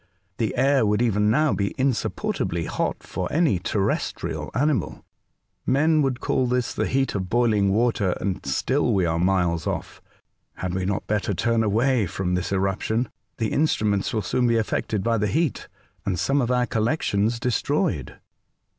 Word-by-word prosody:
The 110 -3 0
air 135 0 +3
would 105 0 +2
even 105 -3 +2
now 150 +5 +3
be 100 -1 -1
insupportably 115 - -1
hot - - -2
to 90 - -1
any 150 - +2
terrestrial 100 +2 -2
animal. 135 - 0 0.6
Men 155 +4 +3
would 135 -3 0
call 130 - 0
this 125 0 0
the - - -1
heat 135 0 0
of 95 -3 -3
boiling 110 -4 +2
water, 105 -4 +1
and 95 -1 -3
still 120 - +1
we 95 -2 +2
are 85 0 0
miles 90 -3 +1
off. - - -4 0.5
Had 90 -1 -4
we 95 0 -1
not 100 +1 -2
better 105 -1 -1
turn 115 +4 +1
away 110 +1 +2
from 90 +1 -2
this 90 +1 -1
eruption? 100 +5 0 0.3
The 110 -2 -1
instruments 105 -10 +1
will 110 -4 -1
soon 125 +6 +1
be 115 -1 +3
affected 105 -2 -1
by 115 0 +1
the 105 - +1
heat, 155 - -1 0.4
and 95 -2 -1
some 140 - +1
of 120 - -1
our 125 -1 +2
collec 115 +7 0
tions 110 +4 +1
destroyed.'' 125 -4 -1
110 Hz, 165 wpm, -24 LUFS, 95-125 Hz, 0.6 s, air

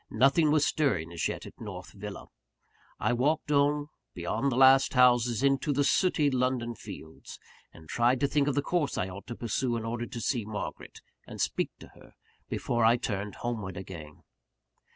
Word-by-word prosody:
Nothing 140 +4 +4
was 150 -1 +3
stirring 100 - 0
as 85 - -1
yet - - -5
at - - -13
North 95 -5 -8
Villa. 105 0 -8 0.7
I - - +1
walked 150 +5 0
on, 145 +1 +2 0.3
beyond 110 +10 -1
the - - -1
last 135 +1 +6
houses, 125 -1 +4
into 140 +2 +2
the 145 0 +2
sooty 150 -2 +2
London 125 -2 0
fields; 80 -7 -10 0.3
and 80 -1 -15
tried 120 +7 +2
to 140 - +3
think 140 0 +1
of 145 - 0
the 145 - +1
course 170 -3 0
I 95 - -1
ought 95 +2 -10
to 120 - -5
pursue 120 +1 -1
in 115 - -5
order 120 +1 -3
to 120 - -7
see 120 0 -1
Margaret, 105 0 -7 0.3
and - - -9
speak - - 0
to - - -12
her, - - -19 0.3
before 120 -1 -1
I 115 +2 +5
turned 105 -3 -3
homeward 110 -6 -4
again. 85 -6 -9
120 Hz, 180 wpm, -29 LUFS, 105-140 Hz, 0.7 s, last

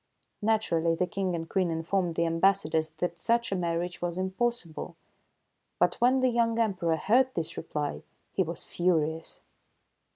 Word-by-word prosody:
Naturally, 170 -7 +2
the 180 - +1
King 185 -1 -2
and 165 -1 -4
Queen 185 0 +1
informed 165 +2 -1
the 170 - +2
ambassadors 165 -2 +2
that 170 +2 -4
such 235 -1 +1
a - - +1
marriage 175 0 -2
was 175 0 -2
impossible. 190 -2 -2 0.8
But, - - +1
when 255 +2 +4
the 255 - +4
young 230 -1 +1
Emperor 185 -8 +1
heard 250 +10 +3
this 165 -2 -2
reply, 150 -3 -3 0.3
he - - 0
was 170 -2 -3
furious. 165 -2 -1
175 Hz, 150 wpm, -29 LUFS, 165-205 Hz, 0.8 s, when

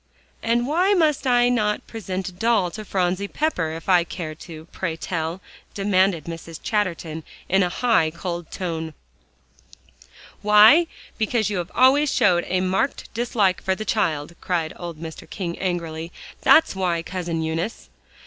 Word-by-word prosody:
"And 235 +1 +1
why 360 +8 +2
may 315 -4 +4
I 245 -1 +4
not 210 -4 0
present 190 -4 -5
a - - -12
doll 200 -1 +1
to 215 +4 -7
Phronsie 185 0 -1
Pepper, 200 - -1
if 165 0 -8
I 180 -3 +5
care 170 -2 -6
to, 160 0 -11
pray 165 -4 -3
tell?" 165 +1 -3 0.3
demanded 190 -4 +2
Mrs. 165 0 -8
Chatterton 170 -6 -2 0.2
in 190 +1 +3
a 180 - +2
high, 220 -5 +2
cold 170 0 -5
tone. 160 -4 -4 1.5
"Why? 215 +11 +7 0.3
because 220 -1 +1
you 195 - -1
have 175 - -4
always 270 +4 +5
showed 175 -3 +3
a 185 0 0
marked 190 +9 -1
dislike 220 -5 +1
for 190 -1 0
the 215 - -6
child," 165 -9 0
cried 165 -3 -1
old 170 -3 -7
Mr. 160 -1 -9
King 175 -3 -4
angrily, 170 -3 -3 0.3
"that's 320 -9 +5
why, 175 -3 0
Cousin 170 -2 -3
Eunice." 165 +7 -4
185 Hz, 150 wpm, -23 LUFS, 170-215 Hz, 1.5 s, Why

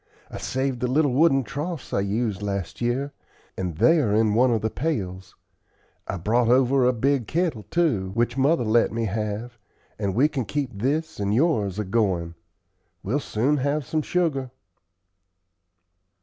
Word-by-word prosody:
I - - -6
saved 130 -1 -2
the 125 - 0
little 140 +1 +2
wooden 135 -1 +4
troughs 150 +5 -5
I - - +2
used 105 0 -1
last 100 -2 -4
year, 130 +4 -1 0.4
and 90 -4 -4
they 120 - +5
are 105 -8 +1
in 110 -1 +3
one 125 +4 +4
of 115 -3 +1
the 110 - -1
pails. 95 - -3 0.7
I 95 - -3
brought 115 +7 +1
over 130 +1 +4
a - - +5
big 130 0 0
kittle, 160 - -1
too, 135 - +1
which 120 +1 +1
mother 140 +2 +2
let 115 +1 +3
me 115 0 -2
have, 110 +3 -4 0.4
and 100 -2 -1
if 95 - -3
we 135 +6 +4
can 135 -6 -3
keep 145 0 -2
this 145 +9 -2
and 100 +1 0
yours 110 - +1
a 105 - -1
goin', 95 -5 0 0.7
we'll 125 +9 0
soon 135 +3 0
have 145 +1 -1
some 155 +4 -1
sugar." 150 -6 -1
120 Hz, 165 wpm, -24 LUFS, 105-140 Hz, 0.7 s, they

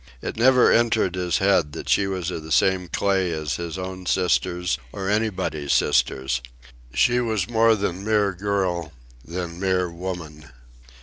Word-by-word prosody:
It - - -5
never 125 +2 +5
entered 115 -5 +2
his 90 -2 0
head 90 -6 +2
that - - -7
she 100 - +2
was 90 -2 -3
of 80 - -5
the 80 +1 -10
same 95 +3 +2
clay 95 0 0
as 75 -2 -3
his 85 0 -5
own 95 0 -6
sisters, 90 -5 0
or 95 -1 -5
anybody's 95 -9 -1
sister. 65 -2 +2 0.7
She 125 - +3
was 110 -6 -1
more 115 -1 +4
than 95 -2 -3
mere 105 -2 +2
girl, 90 -4 -2 0.3
than 85 +2 -6
mere 90 -2 0
woman. 85 -4 -7
90 Hz, 150 wpm, -23 LUFS, 85-100 Hz, 0.7 s, never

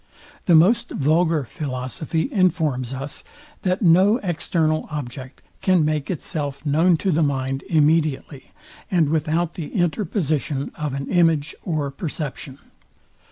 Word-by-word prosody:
The 175 - +6
most 185 +9 +4
vulgar 160 +1 +1
philosophy 135 - -3
informs 155 - +1
us, 135 +2 -5 0.4
that 185 +3 0
no 190 +6 +5
external 160 -3 0
object 130 -2 -7 0.2
can 185 -5 +3
make 150 -2 -1
itself 145 -4 -4
known 165 +4 +3
to 190 +3 0
the 165 0 +2
mind 135 -2 -1
immediately, 155 -3 +1 0.4
and 170 -7 +2
without 160 +2 0
the 165 -6 -5
interposition 160 -5 -1
of 150 -3 -4
an 140 0 -4
image 165 -4 +2
or 155 -5 -2
perception. 145 -2 -5
155 Hz, 120 wpm, -22 LUFS, 140-170 Hz, 0.4 s, The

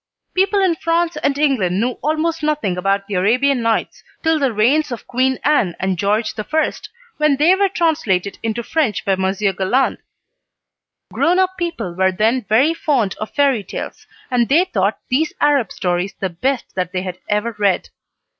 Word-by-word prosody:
People 390 +2 +2
in 370 -3 +3
France 335 +1 0
and 275 - 0
England 230 -12 +1
knew 245 +3 +1
almost 315 +2 -1
nothing 300 -11 0
about 195 +2 0
"The 205 - -7
Arabian 245 +8 +2
Nights" 230 -1 -1 0.2
till 320 -1 +2
the 275 -3 +1
reigns 260 +8 +2
of 240 - -6
Queen 260 +1 0
Anne 250 - +2
and 190 0 0
George 210 +4 0
I., 315 +9 0 0.4
when 300 -2 +3
they 315 +6 +5
were 395 +1 +2
translated 265 - 0
into 225 +1 -2
French 275 -6 -1
by 195 - +2
Monsieur 190 +1 0
Galland. 195 +9 0 1.1
Grown 350 +2 +2
up 375 0 +1
people 340 - -4
were 190 +1 +2
then 225 +6 +1
very 260 +9 +4
fond 260 -12 0
of 215 - -4
fairy 275 -7 +2
tales, 190 - -7 0.2
and 240 -2 +1
they 330 +7 +4
thought 200 - 0
these 305 +5 +1
Arab 285 -8 +2
stories 180 +1 -2
the 190 -2 -2
best 255 +10 -2
that 180 -1 -3
they 185 0 -2
had 180 -1 -6
ever 210 +2 -1
read. 200 -2 +1
240 Hz, 175 wpm, -19 LUFS, 195-305 Hz, 1.1 s, they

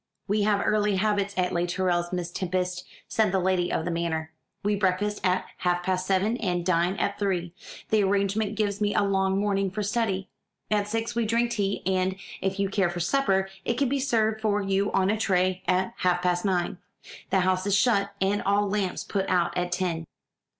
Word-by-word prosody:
"We 210 +1 +1
have 205 -1 +2
early 210 -1 +2
habits 200 0 0
at 180 -1 +1
Les 175 0 0
Tourelles, 175 -1 0
Miss 175 -2 -3
Tempest," 180 0 -2 0.2
said 215 -3 +1
the 190 - +2
lady 185 -1 +1
of 160 - -1
the 175 - -1
manor: 160 -1 -2 0.3
"we 205 +1 +2
breakfast 205 +1 0
at 185 0 +1
half 175 0 0
past 185 0 -1
seven 200 +5 +1
and 175 -6 -1
dine 175 +1 +2
at 200 0 -2
three; 180 -4 -1 0.4
that 215 -1 +3
arrangement 200 +2 +1
gives 205 -1 -1
me 205 0 +1
a - - +3
long 195 -1 +1
morning 195 -1 +1
for 205 +3 -3
study. 200 -3 -1 0.4
At 205 -1 +2
six 225 +2 -2
we 235 -2 0
drink 235 +2 +1
tea, 200 -3 -1
and, 185 0 +1 0.3
if 195 0 -1
you 200 - +2
care 195 -2 +1
for 175 0 -4
supper, 195 -1 +1 0.2
it - - 0
can 265 +1 +1
be 280 +1 0
served 220 -5 +1
for 210 -2 +1
you 195 0 0
on 195 +1 +2
a 215 - -1
tray 185 -3 +1
at 185 +1 +1
half 180 -1 +1
past 180 +1 +1
nine. 180 -2 0 0.5
The 190 - +3
house 185 +1 +1
is 200 - +3
shut, 200 -3 +2
and 200 +2 +1
all 205 +1 +2
lamps 200 -2 -1
put 195 -2 -2
out, 180 -2 +1
at 180 0 -1
ten." 175 -3 -1
195 Hz, 200 wpm, -26 LUFS, 180-205 Hz, 0.5 s, that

